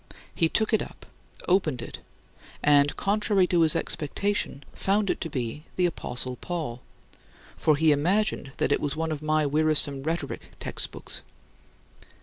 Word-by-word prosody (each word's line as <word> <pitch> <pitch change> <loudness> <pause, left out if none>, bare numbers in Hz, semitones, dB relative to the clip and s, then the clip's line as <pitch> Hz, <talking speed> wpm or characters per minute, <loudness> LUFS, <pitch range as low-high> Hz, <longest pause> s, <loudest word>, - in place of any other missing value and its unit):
He 165 - +2
took 220 +4 +1
it 220 - +4
up, - - -9 0.4
opened 175 -8 +2
it, 115 - -6 0.6
and, 145 0 +4
contrary 205 -1 +2
to 175 -1 +2
his 160 -1 +4
expectation, 160 -1 -1
found 200 +1 +1
it - - -4
to 165 - -3
be 130 +2 -4
the 180 - +2
apostle 125 -6 -3
Paul, 155 -9 -4 0.7
for 155 - +3
he 155 +1 +4
imagined 170 0 +1
that - - +1
it - - +2
was 145 -1 -1
one 160 0 -2
of 155 -1 -3
my 155 0 +2
wearisome 145 -1 +4
rhetoric 155 -1 -4
textbooks. - - -4
155 Hz, 145 wpm, -27 LUFS, 145-180 Hz, 0.7 s, it